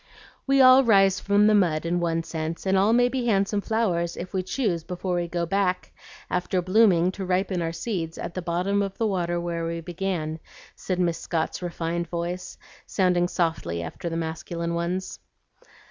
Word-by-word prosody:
"We 275 Hz, 0 st, +5 dB
all 260 Hz, +1 st, +8 dB
rise 195 Hz, -5 st, +4 dB
from 205 Hz, +1 st, +3 dB
the 215 Hz, -, +5 dB
mud 170 Hz, -6 st, +2 dB
in 175 Hz, +1 st, 0 dB
one 165 Hz, -1 st, 0 dB
sense, 165 Hz, +1 st, -5 dB
and 190 Hz, 0 st, +2 dB
all 195 Hz, +3 st, +4 dB
may 245 Hz, +1 st, +4 dB
be 245 Hz, -1 st, -2 dB
handsome 200 Hz, -1 st, +1 dB
flowers 185 Hz, -7 st, -1 dB
if 180 Hz, +3 st, -7 dB
we 190 Hz, -, 0 dB
choose 185 Hz, -, -1 dB
before 180 Hz, +1 st, -4 dB
we 175 Hz, 0 st, -1 dB
go 170 Hz, 0 st, -2 dB
back, 185 Hz, 0 st, 0 dB, 0.4 s
after 180 Hz, +1 st, -1 dB
blooming, 185 Hz, -2 st, +4 dB
to 195 Hz, +1 st, -6 dB
ripen 185 Hz, 0 st, 0 dB
our 165 Hz, -1 st, -1 dB
seeds 165 Hz, -3 st, -4 dB
at 170 Hz, -, -5 dB
the 185 Hz, -, -4 dB
bottom 180 Hz, +4 st, 0 dB
of 195 Hz, -1 st, -3 dB
the 225 Hz, -, 0 dB
water 175 Hz, -4 st, 0 dB
where 170 Hz, -1 st, -3 dB
we 165 Hz, 0 st, -3 dB
began," 170 Hz, -2 st, -3 dB, 0.4 s
said 185 Hz, -1 st, -3 dB
Miss 170 Hz, -2 st, +1 dB
Scott's 165 Hz, +1 st, -2 dB
refined 170 Hz, -1 st, -3 dB
voice, 175 Hz, +2 st, -4 dB, 0.3 s
sounding 180 Hz, -2 st, +2 dB
softly 160 Hz, -, -1 dB
after 85 Hz, -, -5 dB
the 165 Hz, -, -3 dB
masculine 170 Hz, +1 st, -3 dB
ones. 175 Hz, +2 st, -3 dB
180 Hz, 180 wpm, -25 LUFS, 170-195 Hz, 0.4 s, all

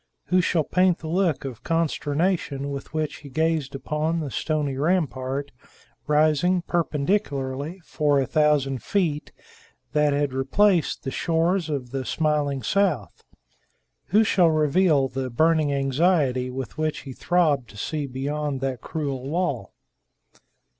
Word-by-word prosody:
Who 185 Hz, 0 st, +4 dB
shall 165 Hz, -2 st, +1 dB
paint 180 Hz, +2 st, +2 dB
the 160 Hz, -, -8 dB
look 170 Hz, -4 st, 0 dB
of 125 Hz, -4 st, -6 dB
consternation 160 Hz, -2 st, -1 dB
with 140 Hz, -1 st, -6 dB
which 155 Hz, -1 st, -2 dB
he 145 Hz, -, -12 dB
gazed 155 Hz, -1 st, 0 dB
upon 155 Hz, +4 st, -1 dB
the 145 Hz, -4 st, -4 dB
stony 150 Hz, -2 st, -1 dB
rampart 140 Hz, -3 st, -1 dB, 0.6 s
rising 155 Hz, +4 st, +3 dB
perpendicularly 150 Hz, -2 st, -1 dB
for 145 Hz, -2 st, +1 dB
a 135 Hz, -, +1 dB
thousand 145 Hz, -3 st, +2 dB
feet 165 Hz, -7 st, -1 dB, 0.6 s
that 150 Hz, -1 st, +3 dB
had 145 Hz, -1 st, 0 dB
replaced 170 Hz, +7 st, +2 dB
the 135 Hz, -, -3 dB
shores 165 Hz, +3 st, 0 dB
of 130 Hz, -5 st, -3 dB
the 135 Hz, -1 st, -3 dB
smiling 145 Hz, -2 st, 0 dB
south? 180 Hz, -, 0 dB, 0.8 s
Who 215 Hz, +3 st, +4 dB
shall 180 Hz, -6 st, +4 dB
reveal 155 Hz, -1 st, +3 dB
the 130 Hz, 0 st, -4 dB
burning 155 Hz, +3 st, +2 dB
anxiety 135 Hz, -2 st, +1 dB
with 130 Hz, +3 st, -6 dB
which 155 Hz, -1 st, -1 dB
he 135 Hz, -, -8 dB
throbbed 150 Hz, -7 st, +1 dB
to 105 Hz, -, -13 dB
see 150 Hz, +5 st, -3 dB
beyond 140 Hz, +2 st, -3 dB
that 135 Hz, -2 st, -2 dB
cruel 140 Hz, -4 st, -4 dB
wall? 165 Hz, -6 st, -2 dB
150 Hz, 135 wpm, -24 LUFS, 135-165 Hz, 0.8 s, Who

